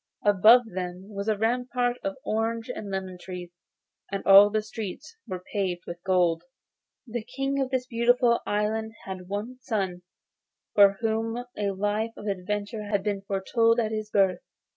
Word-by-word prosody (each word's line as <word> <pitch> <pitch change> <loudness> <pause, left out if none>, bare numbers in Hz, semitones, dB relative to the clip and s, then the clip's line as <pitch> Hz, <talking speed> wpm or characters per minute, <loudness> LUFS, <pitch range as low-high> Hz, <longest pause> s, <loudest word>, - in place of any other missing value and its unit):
Above 215 +5 +7
them 180 +1 -5
was 200 +1 -4
a 215 -1 +2
rampart 245 +2 0
of 195 0 -2
orange 225 +2 -1
and 210 -4 -6
lemon 190 -2 -4
trees, 180 -1 -8 0.6
and 195 - -3
all 200 +1 +9
the 215 0 0
streets 220 - -7
were 185 -3 -5
paved 185 -4 -1
with 170 0 -7
gold. 175 -3 +2 0.6
The 235 -2 -4
King 270 +3 -2
of 265 - -1
this 260 -1 -1
beautiful 240 0 +3
island 220 +1 -1
had 185 -2 -7
one 220 +6 -4
son, 195 -7 -2 0.7
for 200 -1 +7
whom 225 +2 -1
a 205 -1 -1
life 205 +3 -1
of - - -9
adventure 205 +2 -3
had 205 -2 0
been 200 -2 -1
foretold 225 +4 +2
at 220 -2 0
his 215 -1 -3
birth. 190 -4 +3
210 Hz, 160 wpm, -27 LUFS, 195-230 Hz, 0.7 s, all